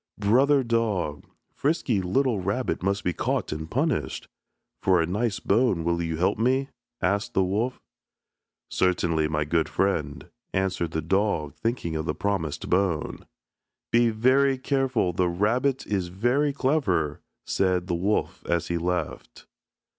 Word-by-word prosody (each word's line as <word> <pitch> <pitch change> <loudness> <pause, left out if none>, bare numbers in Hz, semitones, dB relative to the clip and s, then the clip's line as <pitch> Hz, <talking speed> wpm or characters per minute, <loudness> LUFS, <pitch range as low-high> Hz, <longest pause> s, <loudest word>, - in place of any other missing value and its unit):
"Brother 130 +7 +4
dog, 110 -10 -1 0.3
frisky 140 - 0
little 115 +5 +1
rabbit 100 +8 -1
must 100 +2 0
be 90 - 0
caught - - -1
and 80 +1 -5
punished. 150 - -1 0.5
For 95 -2 +4
a 80 - +2
nice 105 +4 -1
bone 100 -5 +2
will 85 +1 0
you 80 -1 -2
help 90 +5 +1
me?" 130 +4 +1 0.3
asked 100 +3 0
the 95 - +4
wolf. 110 +7 -1 0.9
"Certainly, 85 -4 +1
my 75 -1 -1
good 80 +1 +1
friend," 80 -7 -1 0.3
answered 95 -3 0
the 80 -1 -3
dog, 85 -4 0
thinking 115 -8 -2
of 80 0 -3
the - - -1
promised 95 -7 -2
bone. 90 -4 0 0.6
"Be 120 0 +4
very 130 +5 +3
careful, 130 -8 0
the 90 0 +1
rabbit 125 +9 +1
is 95 -4 -1
very 120 +11 +1
clever," 110 - 0 0.2
said 90 -2 +1
the 90 - -2
wolf 95 +5 -1
as 85 -1 0
he 85 0 0
left. 90 -2 -3
95 Hz, 140 wpm, -26 LUFS, 85-120 Hz, 0.9 s, Brother